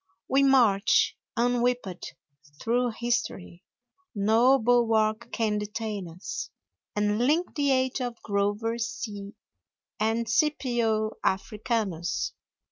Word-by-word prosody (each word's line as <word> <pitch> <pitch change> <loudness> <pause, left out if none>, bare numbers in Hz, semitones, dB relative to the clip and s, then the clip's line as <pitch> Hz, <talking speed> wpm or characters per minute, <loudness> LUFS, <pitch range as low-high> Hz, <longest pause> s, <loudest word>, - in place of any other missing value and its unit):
We 270 +1 +3
march, 235 -7 +4 0.2
unwhipped, 245 -5 0 0.4
through 240 +1 0
history 235 -6 -2 0.5
No 225 +6 +4
bulwark 225 -1 +2
can 215 -2 0
detain 210 -2 -4
us 175 +4 -6 0.5
And 210 +1 +1
link 305 +9 +1
the 285 -2 +1
age 260 0 +1
of 245 -2 -4
Grover 205 +3 -1
C. 210 -3 -5 0.6
And 225 +2 0
Scipio 235 -5 +1
Africanus. 195 -3 -1
225 Hz, 95 wpm, -27 LUFS, 210-245 Hz, 0.6 s, march